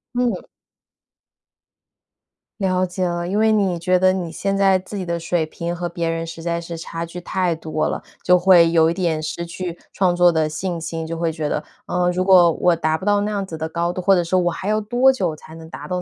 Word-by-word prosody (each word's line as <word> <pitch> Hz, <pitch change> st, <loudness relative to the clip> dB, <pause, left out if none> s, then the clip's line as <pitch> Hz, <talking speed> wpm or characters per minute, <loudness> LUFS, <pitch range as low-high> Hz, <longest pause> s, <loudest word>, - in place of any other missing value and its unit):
嗯。 240 Hz, -7 st, 0 dB, 2.2 s
了 185 Hz, -1 st, +1 dB
解 185 Hz, 0 st, -3 dB
了， 175 Hz, 0 st, -2 dB
因 195 Hz, +4 st, -1 dB
为 220 Hz, 0 st, +4 dB
你 190 Hz, -5 st, +1 dB
觉 180 Hz, +2 st, +2 dB
得 185 Hz, +1 st, +4 dB
你 180 Hz, -3 st, -3 dB
现 195 Hz, +4 st, -2 dB
在 195 Hz, -1 st, +4 dB
自 190 Hz, +3 st, -8 dB
己 185 Hz, -, -4 dB
的 170 Hz, 0 st, -2 dB
水 170 Hz, -1 st, -1 dB
平 170 Hz, +2 st, -5 dB
和 175 Hz, 0 st, -3 dB
别 170 Hz, -1 st, -3 dB
人 165 Hz, 0 st, -3 dB
实 165 Hz, 0 st, -8 dB
在 170 Hz, 0 st, -1 dB
是 170 Hz, 0 st, -7 dB
差 165 Hz, 0 st, -5 dB
距 175 Hz, +1 st, -8 dB
太 180 Hz, -2 st, -1 dB
多 155 Hz, -1 st, -2 dB
了， -, -, -4 dB, 0.2 s
就 180 Hz, 0 st, +4 dB
会 175 Hz, -2 st, +6 dB
有 165 Hz, -1 st, +4 dB
一 -, -, -1 dB
点 165 Hz, -4 st, -1 dB
失 170 Hz, +2 st, -4 dB
去 175 Hz, 0 st, -6 dB
创 185 Hz, -2 st, +2 dB
作 175 Hz, 0 st, +5 dB
的 160 Hz, -2 st, +1 dB
信 175 Hz, +2 st, -3 dB
心， 165 Hz, 0 st, -5 dB
就 165 Hz, 0 st, -4 dB
会 165 Hz, -1 st, 0 dB
觉 155 Hz, -1 st, -3 dB
得， 150 Hz, -, -2 dB, 0.2 s
嗯， 180 Hz, 0 st, +1 dB
如 185 Hz, +1 st, -1 dB
果 180 Hz, -3 st, +6 dB
我 175 Hz, +1 st, +2 dB
达 160 Hz, -1 st, 0 dB
不 185 Hz, -, -9 dB
到 205 Hz, 0 st, +3 dB
那 210 Hz, +1 st, -2 dB
样 200 Hz, -1 st, -2 dB
子 165 Hz, -4 st, -7 dB
的 160 Hz, 0 st, -4 dB
高 170 Hz, +1 st, -1 dB
度， 185 Hz, -, -4 dB
或 195 Hz, +2 st, +4 dB
者 175 Hz, -2 st, +2 dB
说 185 Hz, +2 st, +1 dB
我 175 Hz, 0 st, +1 dB
还 190 Hz, -, -6 dB
要 215 Hz, +1 st, +1 dB
多 245 Hz, +5 st, +3 dB
久 180 Hz, -11 st, -1 dB
才 160 Hz, +1 st, -13 dB
能 160 Hz, 0 st, -11 dB
达 -, -, -9 dB
到 180 Hz, -1 st, -2 dB
175 Hz, 260 characters per minute, -21 LUFS, 165-185 Hz, 2.2 s, 会